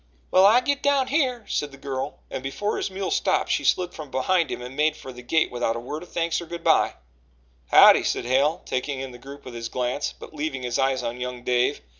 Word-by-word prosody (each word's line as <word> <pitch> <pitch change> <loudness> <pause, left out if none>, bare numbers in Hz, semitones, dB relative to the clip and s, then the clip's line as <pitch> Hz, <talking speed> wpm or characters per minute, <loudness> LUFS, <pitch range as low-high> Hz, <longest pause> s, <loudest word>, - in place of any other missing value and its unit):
"Well, 190 +1 +7
I 235 +4 +6
git 285 +1 -1
down 280 -2 +2
here," 260 -6 0
said 145 -1 -2
the 135 - -13
girl, 135 -1 -5
and - - -4
before 135 +10 -2
his - - -2
mule 190 0 -4
stopped - - +1
she - - +1
slid 180 -1 +1
from 150 -3 -8
behind 165 +6 +1
him - - -4
and 125 +2 -8
made 150 +2 +1
for 130 - -9
the 125 - -10
gate 160 +6 +1
without 120 -2 -1
a - - -3
word 145 +6 -6
of 180 - -13
thanks 170 0 -1
or 170 - -9
good 170 0 -7
by. - - +3 0.8
"Howdye!" - - +8
said - - -1
Hale, 140 +6 +1
taking 130 +1 -2
in 135 -1 -5
the 120 - -12
group 140 +3 -11
with 125 - -8
his 115 -1 -5
glance, 125 +3 -2
but - - -11
leaving 150 -4 -4
his 120 -1 -2
eyes 135 -1 +1
on 120 +1 -4
young 125 -1 -5
Dave. 125 0 +1
140 Hz, 240 wpm, -24 LUFS, 125-175 Hz, 0.8 s, Howdye